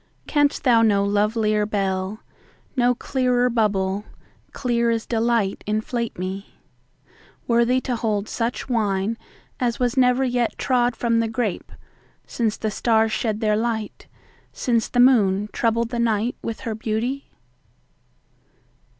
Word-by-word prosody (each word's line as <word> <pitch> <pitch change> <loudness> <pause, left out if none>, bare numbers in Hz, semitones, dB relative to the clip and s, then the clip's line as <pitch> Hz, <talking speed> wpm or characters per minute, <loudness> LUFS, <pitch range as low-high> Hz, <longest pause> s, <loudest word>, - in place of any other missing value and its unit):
Canst 290 -1 +1
thou 240 -4 +5
no 205 -3 +3
lovelier 210 +1 +1
bell, 195 0 -2 0.5
No 245 -1 +3
clearer 250 -1 +1
bubble, 200 -3 0 0.5
clear 235 -2 0
as 230 -1 -1
delight, 230 -3 0
inflate 225 +2 -2
me—Worthy 230 +5 -3
to 255 -2 -2
hold 215 -3 -1
such 235 0 -2
wineAs 230 +2 -2
was 245 -2 0
never 250 0 +3
yet 245 -2 0
trod 245 -2 +1
from 230 -1 +1
the 230 - +1
grape, 225 -4 -3 0.5
Since 225 -3 -1
the 215 - -2
stars 220 +1 +2
shed 215 -1 -1
their 215 -1 +2
light, 220 -1 -3 0.4
since 230 -3 0
the - - -4
moonTroubled 230 0 +3
the 240 - -2
night 230 +1 +1
with 230 - -5
her 225 - -3
beauty? 225 +5 -3
230 Hz, 120 wpm, -23 LUFS, 210-245 Hz, 0.5 s, thou